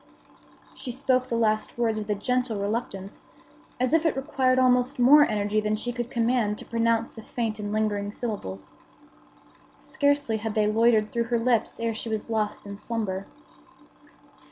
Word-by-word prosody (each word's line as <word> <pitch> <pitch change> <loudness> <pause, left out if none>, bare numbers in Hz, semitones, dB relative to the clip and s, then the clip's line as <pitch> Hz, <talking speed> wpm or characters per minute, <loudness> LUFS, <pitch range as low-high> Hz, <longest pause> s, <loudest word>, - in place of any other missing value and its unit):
She 250 - -6
spoke 255 0 +1
the 235 - -2
last 215 -1 0
words 225 -2 +1
with 210 0 -7
a 210 - +1
gentle 245 +1 -1
reluctance, 200 -2 -4 0.5
as 255 +2 +1
if 325 -1 +4
it 325 -5 +1
required 265 -2 +1
almost 250 +1 +3
more 285 +4 +7
energy 210 0 0
than 215 0 0
she 245 +3 -4
could 240 0 -4
command 230 -4 +1
to - - -9
pronounce 230 0 0
the 225 - -10
faint 220 -1 -3
and 205 0 -4
lingering 205 -1 -1
syllables. 150 - -6 1.1
Scarcely 285 -5 0
had 220 0 -4
they 215 -1 +3
loitered 215 0 +3
through 235 0 0
her 235 0 0
lips 230 -1 0
ere 230 0 -1
she 220 +1 -5
was 220 +1 -3
lost 215 -2 -1
in 200 0 -8
slumber. 205 -5 -3
230 Hz, 165 wpm, -26 LUFS, 210-245 Hz, 1.1 s, more